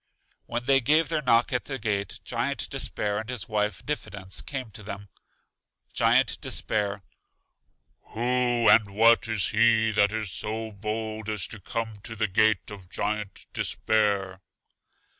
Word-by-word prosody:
When 120 +1 -2
they 135 +1 +4
gave 155 +6 +3
their 160 -2 0
knock 120 0 +3
at 125 - 0
the 135 - -4
gate, 100 -4 -2
Giant - - -1
Despair 105 0 -2
and 110 +2 -7
his 125 -3 -3
wife 105 -3 -1
Diffidence, 100 -10 -3
came 130 -5 -5
to 105 - -9
them. 100 -1 -8 0.8
Giant - - +3
Despair: 100 -2 -1 1.0
Who 120 0 +1
and 100 -3 +5
what 115 +2 +5
is 110 -5 +1
he 110 0 +4
that 100 -1 +3
is 110 -3 -3
so 110 +1 -3
bold 110 +1 -4
as 105 -4 -1
to 110 - -7
come 110 +2 -4
to 115 - -6
the 110 0 0
gate 105 +1 +2
of 95 -3 -10
Giant 105 0 -3
Despair? 100 -3 0
110 Hz, 145 wpm, -27 LUFS, 100-115 Hz, 1.0 s, and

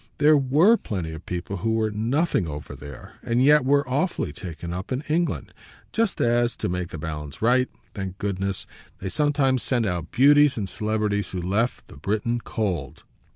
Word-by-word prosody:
There 150 +1 +6
WERE 150 - +5
plenty 90 - -4
of 80 +1 -9
people 90 +2 -4
who 110 +6 0
were 110 -1 +1
nothing 115 - +1
over 75 -1 -6
there 70 -1 -11
and 120 +2 +1
yet 150 0 +6
were 140 0 +3
awfully 140 - -1
taken 85 +1 -7
up 90 +6 -5
in 130 +1 -1
England; 165 +3 -1 0.4
just 225 -4 0
as 120 0 +2
to - - -3
make 90 0 -2
the 85 - -7
balance 75 -2 -6
right, 125 +3 +3 0.2
thank 95 -2 -5
goodness 100 -1 -2 0.3
they 95 - -5
sometimes 140 -1 +2
sent 120 -4 +1
out 85 -4 -2
beauties 145 +2 +5
and 100 -3 -2
celebrities 105 0 -1
who 95 - -4
left 100 +7 -1
the - - -13
Briton 110 - -1
cold. 90 -11 -3
110 Hz, 175 wpm, -24 LUFS, 90-130 Hz, 0.4 s, There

